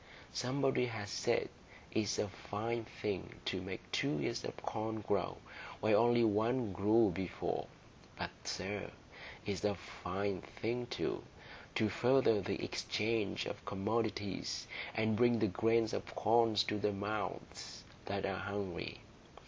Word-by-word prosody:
Somebody 130 0 +2
has 105 -4 -4
said - - +2 0.4
it's 110 -3 +1
a - - +1
fine 110 +4 -3
thing 100 -4 -3
to - - 0
make - - -6
two 75 - +1
ears 70 - -1
of - - -5
corn 110 0 -2
grow 100 -3 0 0.4
where 110 0 +4
only 120 +2 +6
one 110 +1 +2
grew 105 +5 +5
before; 95 -2 -2 0.5
but, - - -3
sir, 100 +2 -3 0.6
it's 100 -2 -2
a 105 -1 +2
fine 95 0 -3
thing, 120 +2 -3
too, - - -1 0.5
to 110 - +3
further 120 0 +4
the - - -2
exchange 110 -1 0
of - - -5
commodities, 105 -1 -1 0.3
and 110 -1 +2
bring 120 +1 +5
the 110 - +3
grains 115 +2 +3
of - - -4
corn 115 0 +4
to 105 +1 +2
the 105 +1 +2
mouths 105 +2 -4 0.2
that 100 0 -1
are 95 -1 -1
hungry. 95 -2 -3
105 Hz, 135 wpm, -36 LUFS, 100-115 Hz, 0.6 s, only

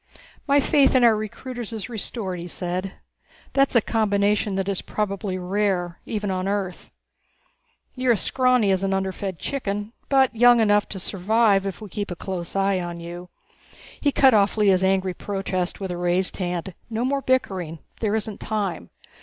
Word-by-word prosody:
"My 285 +1 +5
faith 280 -1 +4
in 255 - +5
our 230 -2 +6
recruiters 235 +2 -6
is 220 -3 -5
restored," 210 -5 -4
he 170 - -6
said. 180 +2 -4 0.6
"That's 275 -1 +3
a 235 - +6
combination 205 -2 +1
that 195 0 -1
is 195 -2 -1
probably 200 -2 -3
rare 185 -2 -1
even 210 -3 -2
on 185 0 -2
Earth. 195 -2 -3 1.0
You're 255 -2 +2
as 215 - -1
scrawny 255 -5 +3
as 190 -1 +1
an 195 0 +1
underfed 190 -1 -3
chicken, 210 -4 -3 0.2
but 265 -3 +3
young 245 +1 +6
enough 205 -2 +3
to 195 - -5
survive 200 +1 +2
if 195 +2 -6
we 210 - -8
keep 205 +3 -4
a 175 - -4
close 180 -1 -5
eye 195 -1 +2
on 175 -1 -5
you." 175 +1 -8 0.7
He 285 - +2
cut 265 -2 +5
off 205 0 +3
Lea's 195 -3 +4
angry 190 -1 +2
protest 185 -1 -3
with 190 -2 -4
a 175 - -4
raised 175 +1 0
hand. 180 0 -3 0.2
"No 230 +2 -1
more 275 +1 0
bickering. 190 -11 0 0.2
There 215 -1 0
isn't 215 -2 -3
time. 200 - -3
200 Hz, 170 wpm, -24 LUFS, 185-225 Hz, 1.0 s, our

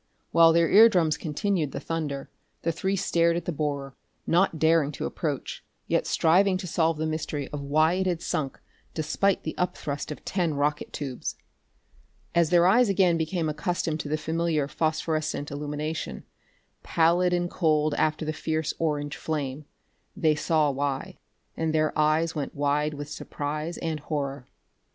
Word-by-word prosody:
While 165 0 +7
their 165 0 +4
ear 220 +7 +8
drums 165 -7 +2
continued 160 0 -1
the - - -3
thunder, 150 -4 -4 0.3
the 170 - +1
three 190 +4 -1
stared 170 -3 +2
at 170 - -4
the - - -1
borer, 140 -3 -3 0.3
not 175 -1 +2
daring 160 -2 +3
to - - -4
approach, 145 -5 -4 0.2
yet - - 0
striving 185 +4 +3
to 185 - -6
solve 165 -2 +1
the 155 - -1
mystery 155 -2 -3
of 145 - -5
why 155 +4 +3
it 190 +1 0
had 175 -2 0
sunk 145 -4 -3 0.4
despite 190 +5 +1
the 155 - -4
up 180 0 0
thrust 145 +1 -4
of 150 - -8
ten 175 -5 0
rocket 145 +1 -1
tubes. 135 -4 -4 1.0
As 170 -2 +3
their 175 0 +5
eyes 225 +5 +5
again 185 -3 +3
became 165 +1 -1
accustomed 160 0 -2
to 145 - -5
the 155 - 0
familiar 160 -2 0
phosphorescent 155 -1 -1
illumination, 150 +2 -4 0.6
pallid 170 +2 +2
and 175 0 +1
cold 155 -4 +1
after 155 +1 0
the 155 - -2
fierce 160 0 -2
orange 145 -3 -1
flame, 145 -2 -3 0.5
they 160 -6 +3
saw 150 -1 +2
why 140 0 -3 0.4
and 160 -1 -1
their 155 0 +1
eyes 155 +2 +2
went 145 -3 -4
wide 145 +1 0
with 145 0 -6
surprise 150 +2 -4
and 160 -2 -3
horror. 140 -3 -4
155 Hz, 160 wpm, -26 LUFS, 150-170 Hz, 1.0 s, ear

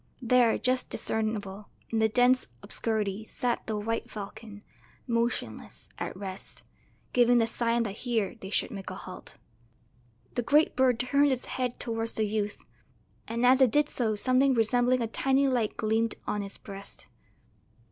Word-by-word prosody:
There, 245 -2 +4
just 255 0 0
discernible, 210 -2 -3 0.2
in 225 - +1
the 220 0 +3
dense 250 +3 +3 0.2
obscurity 210 -1 -2
sat 240 +2 -2
the 220 -1 -1
white 225 +2 -2
falcon, 210 0 -9 0.4
motionless, 235 0 -3
at - - -4
rest, 195 -1 -8 0.5
giving 245 0 +5
the 230 - +4
sign 230 +1 +1
that 205 -2 -5
here 230 -5 -1
they 190 - -7
should - - 0
make 195 -2 -6
a - - -6
halt. - - -10 1.0
The - - 0
great 295 +6 +3
bird 255 -2 +3
turned 280 +3 +3
its 255 -1 -1
head 250 -2 -3
towards 225 -1 -1
the 220 - 0
youth, 210 0 -2 0.7
and 235 +2 0
as 260 +2 +6
it 260 - +7
did 295 +5 +2
so 220 -4 -1
something 255 +4 +3
resembling 245 +2 +2
a - - -1
tiny 270 +4 +2
light 240 -5 0
gleamed 225 0 +1
on 210 - -1
its 200 0 -6
breast. 200 -1 -10
230 Hz, 155 wpm, -28 LUFS, 215-250 Hz, 1.0 s, it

